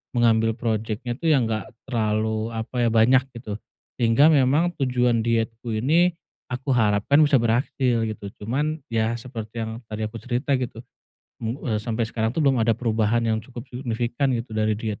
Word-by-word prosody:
mengambil 115 -1 +3
projeknya 110 +1 -2
tuh 165 - +1
yang 140 -6 +4
nggak 110 +2 -2 0.2
terlalu 110 -2 -1
apa, 120 +1 -1
ya, - - +3
banyak, 120 +4 +5
gitu, 110 -3 -6 0.4
sehingga 120 +6 +5
memang 145 +5 +3
tujuan 125 -3 +2
dietku 115 0 -1
ini 165 +9 +3 0.4
aku 130 +2 -2
harapkan 110 +5 +3
bisa 145 -1 +4
berhasil, 120 0 +1
gitu, 110 -2 -6 0.2
cuman, 150 +7 -1
ya, 115 +1 +1
seperti 115 -2 -6
yang 110 - -4 0.2
tadi 110 0 -4
aku 110 +2 -5
cerita, 125 +4 -2
gitu, 120 -2 -5 0.6
mmm, 115 +3 -3
eee, 110 -5 0
sampai 115 +1 -1
sekarang 110 0 -1
tuh 160 - +1
belum 135 -3 +3
ada 115 -1 +2
perubahan 115 -1 +1
yang 110 -1 +1
cukup 120 +1 -10
signifikan, 125 +1 -1
gitu, 115 -1 -6
dari 110 0 +1
diet. 110 0 -4
115 Hz, 170 wpm, -24 LUFS, 110-130 Hz, 0.6 s, banyak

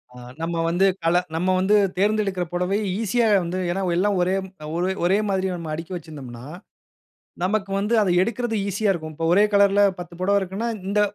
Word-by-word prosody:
ஆ - - -12 0.2
நம்ம 165 +1 -2
வந்து, 175 +4 +2 0.2
கல 170 +2 +4 0.2
நம்ம 185 +3 +1
வந்து 195 +3 +3 0.2
தேர்ந்தெடுக்கிற 200 -2 +1
புடவை 180 +3 0 0.2
ஈசியா 230 +2 +1 0.2
வந்து 175 +2 -3
ஏன்னா, 190 +3 -2
எல்லாம் 195 +2 +1
ஒரே 185 +2 +1
ம் 190 - -13 0.2
ஒரே 180 +2 0
ஒரேமாதிரி 195 0 +1
நம்ம 165 -3 -6
அடுக்கி 165 +3 -6
வச்சிருந்தம்னா, 135 -8 -9 1.0
நமக்கு 195 +1 -1
வந்து 210 +3 -1
அத 200 - +1
எடுக்குறது 230 +3 -1
ஈசியா 205 +2 0
இருக்கும். 155 -3 -6
இப்போ 165 +2 -3
ஒரே 200 +4 +5
கலர்‌ல 200 0 +5 0.2
10 175 -1 -8
புடவ 200 +2 +3
இருக்குன்னா, 195 +5 -3 0.2
இந்த, 210 +1 +1
190 Hz, 170 wpm, -23 LUFS, 175-205 Hz, 1.0 s, ஒரே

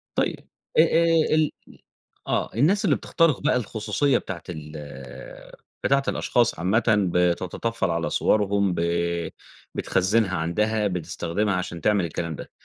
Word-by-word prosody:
طيب - - -2 0.3
أ - - +10
أ 165 -1 +3
ال 155 -1 +3 0.8
آه، - - 0
الناس 165 - +3
اللي - - +3
بتخترِق 165 -6 +1
بقى - - +2
الخصوصيّة 125 +4 0
بتاعة 85 - -7
ال 75 -3 -8 1.1
بتاعة 135 0 +3
الأشخاص 120 -7 +1
عامَّةً 95 +7 +2 0.3
بتتّطفّل 90 +5 0
على 85 0 -1
صورهُم، 100 -3 +2
ب 85 - -1 0.9
بتخزنها 95 +1 +1
عندها، 105 +6 0
بتستخدمها 95 +2 -2
عشان 90 -2 -4
تعمل 105 0 +2
الكلام 85 -1 -4
ده، - - -9
105 Hz, 125 wpm, -24 LUFS, 85-125 Hz, 1.1 s, أ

